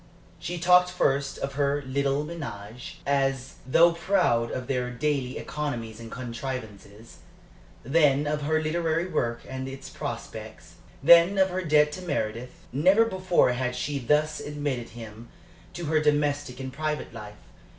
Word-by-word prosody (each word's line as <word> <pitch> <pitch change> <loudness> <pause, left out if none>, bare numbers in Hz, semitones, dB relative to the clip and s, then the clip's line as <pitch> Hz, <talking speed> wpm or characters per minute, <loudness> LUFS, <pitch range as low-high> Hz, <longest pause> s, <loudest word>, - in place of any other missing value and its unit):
She 175 - -4
talked 180 +1 +5
first 140 -6 0
of 140 0 -4
her 140 0 0
little 140 +2 0
ménage, 125 -8 -7
as 135 -1 0
though 170 +6 +6
proud 165 -9 +1
of 130 - -4
their 125 -2 -1
daily 135 0 -1
economies 120 -7 -4
and 115 -1 -9
contrivances; 115 -4 -7 0.7
then 145 +1 +3
of 150 0 -1
her 155 +2 +1
literary 165 +1 0
work 120 -10 -1
and 130 0 -5
its 135 0 -8
prospects; - - -7 0.3
then 170 +5 +7
of 190 -1 +3
her 185 +1 -1
debt 150 -3 +4
to 185 - -7
Meredith. 125 -7 -4
Never 190 - +5
before 185 - +2
had 125 0 -2
she 140 +3 -2
thus 150 +4 +1
admitted 145 -5 -3
him 115 0 -10 0.4
to 175 - -5
her 155 +1 +2
domestic 145 -3 0
and 130 -1 -6
private 155 -1 -3
life. 105 -2 -9
140 Hz, 145 wpm, -26 LUFS, 125-155 Hz, 0.7 s, then